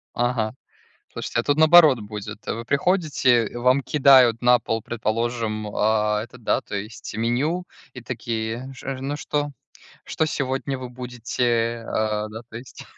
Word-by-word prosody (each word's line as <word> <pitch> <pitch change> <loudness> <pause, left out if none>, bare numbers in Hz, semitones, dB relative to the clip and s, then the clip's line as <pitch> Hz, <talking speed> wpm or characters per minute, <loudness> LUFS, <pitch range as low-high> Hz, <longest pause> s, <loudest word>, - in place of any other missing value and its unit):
Ага, 120 -3 0 0.6
слушайте, - - -4
а - - -4
тут 145 0 +2
наоборот 160 -5 +7
будет: 105 0 -8
вы 115 +1 -3
приходите, 140 - +2
и - - -9
вам 125 +3 +3
кидают 130 -5 +5
на 125 0 +6
пол, 115 -1 -3
предположим, 115 -1 -2
а, 105 0 +1
это, 120 +2 -11
да, 115 - 0
то - - -9
есть 105 +3 -6
меню, 130 +11 0 0.3
и 125 - -9
такие: 115 +1 -4
"Ш 130 - -10
э 135 - -3
ж - - -9
ну, 140 +2 -3
что 145 0 -2 0.5
что 160 - 0
сегодня 135 -2 -2
вы 130 -1 -7
будете?" 120 -1 -2
А, 105 -1 -1
да, 110 +1 -8
то - - -12
есть. 125 +1 -11
120 Hz, 160 wpm, -23 LUFS, 110-135 Hz, 0.6 s, наоборот